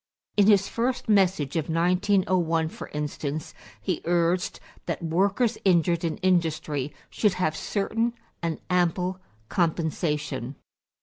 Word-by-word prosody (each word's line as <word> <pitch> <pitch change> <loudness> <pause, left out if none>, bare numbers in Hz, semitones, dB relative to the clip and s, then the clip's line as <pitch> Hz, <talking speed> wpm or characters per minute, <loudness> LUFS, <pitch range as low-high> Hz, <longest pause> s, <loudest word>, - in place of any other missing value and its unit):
In 205 -1 +5
his 200 -2 +5
first 245 +2 -1
message 190 -9 +2
of 160 -2 -1
1901, 180 -1 +2
for - - -8
instance, 150 0 -4 0.3
he 185 -5 -2
urged 175 +1 +1 0.3
that - - -3
workers 195 +8 +1
injured 170 -2 +3
in 165 -2 -1
industry 155 -6 +1 0.2
should 210 -4 +2
have 155 -4 0
certain 225 +6 -1 0.3
and 165 -2 -2
ample 180 +1 +1 0.3
compensation. 150 -6 -1
175 Hz, 115 wpm, -26 LUFS, 160-190 Hz, 0.3 s, In